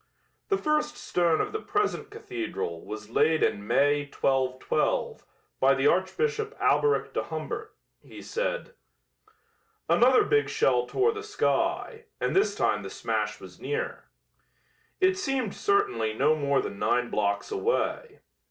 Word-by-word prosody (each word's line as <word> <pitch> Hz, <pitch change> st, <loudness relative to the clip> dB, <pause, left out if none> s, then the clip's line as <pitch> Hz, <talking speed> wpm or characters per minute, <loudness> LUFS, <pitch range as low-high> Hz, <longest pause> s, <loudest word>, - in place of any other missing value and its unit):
"The 395 Hz, -, +3 dB
first 305 Hz, -3 st, 0 dB
stone 170 Hz, -3 st, +1 dB
of -, -, -3 dB
the 435 Hz, -, -4 dB
present 415 Hz, 0 st, -1 dB
cathedral 375 Hz, -, -5 dB
was 110 Hz, 0 st, -8 dB
laid 160 Hz, +5 st, +3 dB
in 100 Hz, 0 st, 0 dB
May, 145 Hz, +4 st, +3 dB
1212, 130 Hz, -2 st, 0 dB, 0.4 s
by 135 Hz, +1 st, +5 dB
the 135 Hz, +1 st, 0 dB
Archbishop 440 Hz, -, +1 dB
Alberic 440 Hz, -1 st, +2 dB
de -, -, -1 dB
Humbert," -, -, -5 dB, 0.3 s
he -, -, -13 dB
said. -, -, -3 dB, 1.1 s
Another 250 Hz, +2 st, +5 dB
big 435 Hz, 0 st, +2 dB
shell 455 Hz, +1 st, +2 dB
tore 420 Hz, +3 st, +2 dB
the 425 Hz, -1 st, -6 dB
sky, 440 Hz, +2 st, -1 dB
and -, -, -1 dB
this 390 Hz, +2 st, +3 dB
time -, -, +1 dB
the -, -, -7 dB
smash -, -, -2 dB
was -, -, -13 dB
nearer. 445 Hz, +3 st, -4 dB, 0.9 s
It 375 Hz, 0 st, +3 dB
seemed 270 Hz, -, -1 dB
certainly 400 Hz, -, +1 dB
no 155 Hz, +7 st, +3 dB
more 140 Hz, -2 st, +1 dB
than 100 Hz, -, -6 dB
nine 120 Hz, +3 st, +1 dB
blocks 100 Hz, -, -1 dB
away. 430 Hz, +1 st, -1 dB
305 Hz, 135 wpm, -27 LUFS, -, 1.1 s, by